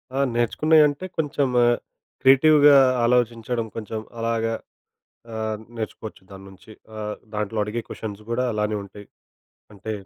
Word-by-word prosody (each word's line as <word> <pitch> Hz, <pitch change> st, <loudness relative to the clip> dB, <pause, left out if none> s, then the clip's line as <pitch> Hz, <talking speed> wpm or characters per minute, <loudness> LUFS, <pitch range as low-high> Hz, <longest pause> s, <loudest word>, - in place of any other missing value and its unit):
ఆ! -, -, 0 dB, 0.2 s
నేర్చుకున్నయంటే, 150 Hz, +6 st, +3 dB
కొంచెం 145 Hz, -3 st, 0 dB, 0.7 s
క్రియేటివ్‌గా 145 Hz, +2 st, +6 dB, 0.3 s
ఆలోచించడం 120 Hz, -1 st, 0 dB
కొంచెం 110 Hz, 0 st, -5 dB, 0.2 s
అలాగా 115 Hz, 0 st, -1 dB, 0.8 s
ఆహ్, 110 Hz, -1 st, -2 dB, 0.2 s
నేర్చుకోవచ్చు 110 Hz, -2 st, -7 dB
దాన్నుంచి. 95 Hz, +2 st, -13 dB, 0.3 s
ఆహ్, 105 Hz, 0 st, -4 dB, 0.2 s
దాంట్లో 105 Hz, +1 st, -3 dB
అడిగే 110 Hz, +3 st, -3 dB
క్వెషన్స్ 105 Hz, -1 st, -7 dB
కూడా 125 Hz, +2 st, 0 dB
అలానే 105 Hz, 0 st, -1 dB
ఉంటాయి. 100 Hz, +1 st, -13 dB, 0.7 s
అంటే 105 Hz, +2 st, -6 dB
115 Hz, 105 wpm, -23 LUFS, 105-130 Hz, 0.8 s, క్రియేటివ్‌గా